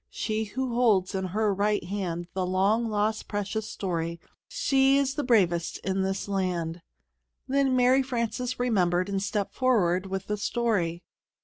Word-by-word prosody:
She 220 0 -2
who 250 +3 -3
holds 215 -6 +3
in 190 -1 -1
her 205 +3 0
right 205 +2 +1
hand 180 -3 -3
The 185 - -1
long 200 +5 +1
lost 215 +1 -1
precious 205 +1 -3
story; 170 -3 -3 0.3
She's 275 - +2
the 295 0 -2
bravest 180 -9 +2
in 190 0 0
this 195 +1 -2
land. 180 -4 -2 0.7
Then 270 -1 +2
Mary 255 +2 +4
Frances 250 -1 -2
remembered, 185 -6 +1
and 195 -1 -1
stepped 205 0 -2
forward 195 -8 +2
with 190 0 -4
the 210 - -2
story. 205 -7 -1
205 Hz, 145 wpm, -27 LUFS, 185-240 Hz, 0.7 s, Mary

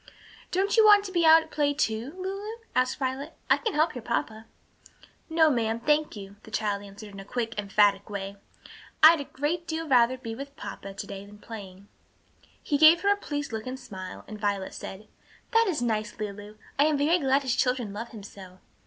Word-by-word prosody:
"Don't 390 +4 0
you 445 - +7
want 415 -1 +7
to 380 - -6
be 340 -3 +3
out 320 0 +8
at 315 - -18
play, 290 -1 +1
too, 240 +1 -1
Lulu?" 395 +4 -5 0.2
asked 255 0 +1
Violet. 270 +3 -3 0.2
"I - - +7
can 445 -7 -3
help 310 +2 +2
your 245 - -6
papa." 225 -1 -3 0.8
"No, 320 -1 +4
ma'am, 225 -3 0
thank 300 +3 +1
you," 200 -1 -10
the - - -14
child 210 -2 -1
answered 205 +1 -11
in 195 - -9
a - - -7
quick, 230 +2 -3
emphatic 200 0 +2
way. 200 -1 -5 0.7
"I'd 320 -1 +9
a - - -6
great 315 +6 -3
deal 320 0 -3
rather 255 -2 +4
be 230 -3 -6
with 280 +4 -8
papa 195 0 -8
to - - -6
day 195 0 -8
than 205 +1 -14
playing." 200 -3 -10 0.8
He 290 -2 0
gave 315 +2 +8
her 405 0 +4
a - - -4
pleased 290 - -5
look 220 +2 -4
and 260 +1 -5
smile, 185 -5 -9
and 215 -1 -8
Violet 200 -2 -1
said, 205 +3 -8 0.4
"That 455 -1 +4
is 305 -9 -1
nice, 215 -3 -2
Lulu; 205 0 -6 0.2
I 290 - +6
am 305 -1 +2
very 315 +5 +3
glad 275 -1 +2
his 255 -2 0
children 250 -6 0
love 225 +3 -5
him 215 -3 -10
so." 190 -2 -12
250 Hz, 205 wpm, -27 LUFS, 210-310 Hz, 0.8 s, I'd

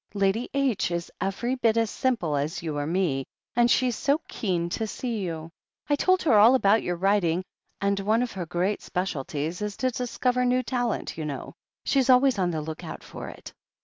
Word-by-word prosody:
"Lady 200 +4 +1
H. 270 -10 +1
is 170 0 -3
every 195 +7 -1
bit 230 -3 +2
as 225 -2 +1
simple 220 - 0
as 145 +4 -2
you 155 -3 -3
or 145 0 -2
me, 165 -6 0 0.3
and 240 0 +4
she's 250 -1 +3
so 280 +6 +1
keen 175 -5 -1
to 220 +5 -2
see 235 0 -3
you. 165 -3 -4 0.4
I 290 - +3
told 370 +5 +2
her 235 -10 +5
all 230 +5 +7
about 220 -3 +4
your 175 - -2
writing, 185 -2 +2 0.4
and 200 0 +1
one 215 +4 +2
of 250 - -3
her 180 -3 -5
great 180 +4 -1
specialties 165 -2 -3
is 210 -1 -3
to 255 0 +1
discover 250 +1 0
new 250 +1 +2
talent, 245 -8 -2
you 155 - -3
know. 140 -3 -5 0.3
She's 270 -2 +2
always 255 -3 +5
on 180 -2 +2
the 160 -3 -2
look 155 0 -6
out - - -7
for - - -8
it." - - -11
200 Hz, 200 wpm, -26 LUFS, 170-245 Hz, 0.4 s, all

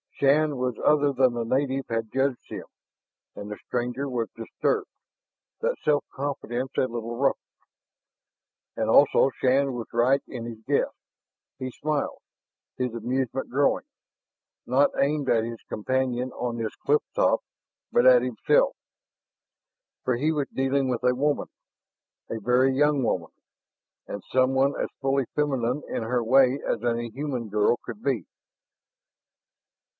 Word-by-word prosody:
Shann 145 +1 +3
was 125 -2 -1
other 145 -1 +4
than 130 -2 +3
the 120 -1 -2
native 135 +3 0
had 115 -1 -2
judged 135 -1 0
him, - - -6 0.7
and 100 - -7
the 105 - -5
stranger 125 +3 -2
was 120 -4 -2
disturbed, 400 - -1 0.7
that - - 0
self 145 -2 +2
confidence 135 -2 -3
a - - +4
little 120 -2 -3
ruffled. 135 +2 +1 1.3
And - - -1
also 135 - +5
Shann 135 +1 +2
was 120 -2 -5
right 125 +4 +3
in 120 -3 -6
his 115 -2 -7
guess. - - +1 0.6
He 130 -1 -5
smiled, 150 +2 -2 0.6
his 125 -2 -1
amusement 125 +3 -2
growing 140 +3 +2 0.8
not 135 +3 +4
aimed 145 0 +1
at 115 -2 +3
his 115 0 -6
companion 130 +2 -1
on 120 -1 -3
this 115 -2 -3
cliff 150 +1 +2
top, - - +3 0.5
but 120 - +4
at 125 -1 +8
himself. 125 -3 +2 1.3
For 125 -2 +1
he 150 +5 +1
was 150 -3 -1
dealing 135 0 0
with 125 -1 -2
a 125 0 +3
woman, 145 +3 0 0.8
a 115 - -3
very 125 +4 +3
young 145 0 +3
woman, - - -1 0.8
and 100 - -6
someone 130 +2 +3
as - - -1
fully 135 -1 +1
feminine 135 -2 0
in - - -2
her 120 +1 0
way 130 +3 +4
as 115 - -1
any 120 0 0
human 130 -4 -4
girl 105 +3 +2
could 215 - -8
be. - - 0
130 Hz, 140 wpm, -26 LUFS, 120-140 Hz, 1.3 s, at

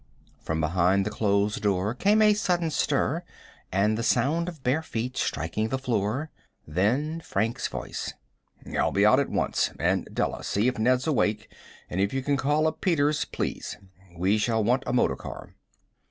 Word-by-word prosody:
From 80 0 -2
behind 90 +4 +2
the 105 - -2
closed 100 0 +1
door 100 +1 +1
came 205 - +3
a 210 0 +6
sudden 175 -5 0
stir 150 +3 0 0.5
and 100 +3 +2
the 115 - -2
sound 145 +9 +1
of 155 -6 -12
bare 130 +5 +1
feet 125 -5 -4
striking 85 +9 -1
the 130 - -1
floor; 125 +3 -1 0.4
then 125 - 0
Frank's 115 -5 -1
voice. - - -5 0.6
"I'll - - +2
be - - +3
out - - +6
at - - 0
once. - - 0
And, - - 0
Della, - - -2
see 105 +4 +1
if 125 -2 -1
Ned's 125 +3 +2
awake, 110 -8 0 0.3
and 90 - -2
if 100 +4 0
you 135 - -1
can 145 +1 +1
call 145 +3 +1
up 160 0 -1
Peters, 150 -4 +2
please. - - -4 0.4
We 95 +5 +2
shall 110 +1 +1
want 125 +5 +2
a 125 - -1
motor 95 - +2
car." - - -9
120 Hz, 170 wpm, -26 LUFS, 100-150 Hz, 0.6 s, a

